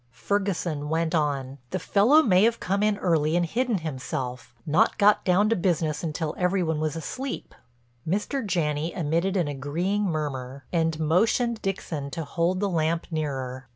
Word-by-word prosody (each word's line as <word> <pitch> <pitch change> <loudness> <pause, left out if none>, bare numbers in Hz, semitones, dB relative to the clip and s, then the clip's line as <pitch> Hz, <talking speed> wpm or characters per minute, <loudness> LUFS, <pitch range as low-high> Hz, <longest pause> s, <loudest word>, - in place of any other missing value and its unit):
Ferguson 160 - -2
went 165 +1 0
on: 140 -4 -1
"The - - -2
fellow 225 - +4
may 185 -7 +4
have 230 0 +1
come 195 +2 -1
in 210 -1 +2
early 160 -4 +1
and 175 0 +2
hidden 235 +5 0
himself—not 130 -3 -2
got 210 0 +4
down 190 +3 +3
to 230 - +3
business 170 -5 0
until 155 -1 -3
every 180 +1 +2
one 160 -2 -1
was 155 -1 -1
asleep." 255 - -5 0.5
Mr. 210 - -1
Janney 165 -5 -1
emitted 170 +4 0
an 175 -4 +1
agreeing 165 +9 -1
murmur 140 -5 -3
and 165 -2 +1
motioned 220 +8 +2
Dixon 160 -7 -3
to 165 +3 -4
hold 170 +5 0
the 205 - +2
lamp 165 -2 0
nearer. 135 -5 -3
165 Hz, 155 wpm, -26 LUFS, 150-195 Hz, 0.5 s, fellow